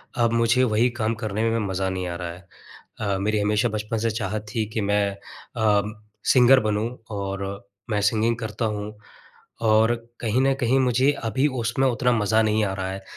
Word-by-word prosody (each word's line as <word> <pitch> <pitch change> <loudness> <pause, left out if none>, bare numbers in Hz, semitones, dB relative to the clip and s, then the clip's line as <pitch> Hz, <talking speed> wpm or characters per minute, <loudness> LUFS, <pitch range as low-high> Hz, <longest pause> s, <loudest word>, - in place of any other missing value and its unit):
अब 115 -1 +2
मुझे 115 +2 +3
वही 115 +1 +3
काम 110 +1 0
करने 110 +1 -1
में 115 0 0
मज़ा 95 0 -1
नहीं 90 -1 -3
आ 85 - -4
रहा 85 -1 -5
है। 90 +1 -13 0.5
अ, 100 -2 -1
मेरी 105 +1 0
हमेशा 105 +3 +1
बचपन 110 +1 -3
से 115 +1 0
चाहत 105 -1 -3
थी 110 - +1
कि 110 - -1
मैं 105 0 +1 0.5
अ, 105 -2 +3 0.4
सिंगर 130 +1 +6
बनूँ 110 +1 -1 0.3
और 100 -1 -3 0.4
मैं 105 -2 0
सिंगिंग 110 +3 +2
करता 115 0 -3
हूँ। 105 0 -4 0.7
और 110 +2 +4 0.3
कहीं 115 +2 +1
न 135 0 +3
कहीं 125 +1 +2
मुझे 130 +2 +3
अभी 120 +6 +1
उसमें 115 +4 +1
उतना 125 0 +2
मज़ा 110 -1 +2
नहीं 110 0 +2
आ 95 - -1
रहा 95 -1 -3
है, 95 0 -6
110 Hz, 185 wpm, -24 LUFS, 105-115 Hz, 0.7 s, सिंगर